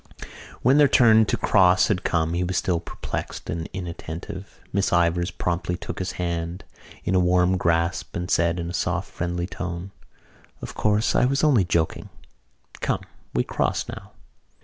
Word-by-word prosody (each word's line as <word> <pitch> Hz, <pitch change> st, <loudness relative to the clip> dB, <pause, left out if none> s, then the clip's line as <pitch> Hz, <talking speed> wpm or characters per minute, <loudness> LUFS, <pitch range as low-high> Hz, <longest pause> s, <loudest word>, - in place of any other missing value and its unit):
When 135 Hz, +4 st, +5 dB
their 145 Hz, -, +7 dB
turn 110 Hz, -4 st, +6 dB
to -, -, 0 dB
cross 90 Hz, -2 st, +4 dB
had 95 Hz, -3 st, 0 dB
come 80 Hz, -1 st, 0 dB
he 90 Hz, +1 st, 0 dB
was 90 Hz, 0 st, -1 dB
still 90 Hz, -3 st, +1 dB
perplexed 85 Hz, -, -6 dB
and 80 Hz, 0 st, -4 dB
inattentive. 90 Hz, +1 st, -7 dB
Miss 100 Hz, 0 st, +1 dB
Ivors 85 Hz, 0 st, +2 dB
promptly 90 Hz, 0 st, -2 dB
took -, -, -6 dB
his 95 Hz, -1 st, -3 dB
hand 85 Hz, +1 st, -3 dB, 0.4 s
in 95 Hz, -, -1 dB
a 95 Hz, -, +4 dB
warm 90 Hz, +1 st, +3 dB
grasp 85 Hz, -1 st, 0 dB
and 90 Hz, 0 st, -3 dB
said 85 Hz, +1 st, +2 dB
in 85 Hz, 0 st, -3 dB
a -, -, -8 dB
soft 90 Hz, +1 st, -2 dB
friendly 85 Hz, 0 st, -2 dB
tone: 90 Hz, 0 st, -5 dB, 0.7 s
"Of -, -, -7 dB
course, 105 Hz, +1 st, +1 dB
I -, -, +4 dB
was 135 Hz, +3 st, +1 dB
only 130 Hz, -11 st, +4 dB
joking. 85 Hz, -2 st, -1 dB, 0.7 s
Come, -, -, -1 dB, 0.3 s
we 60 Hz, -, +3 dB
cross -, -, -1 dB
now." -, -, -9 dB
90 Hz, 165 wpm, -24 LUFS, 85-95 Hz, 0.7 s, their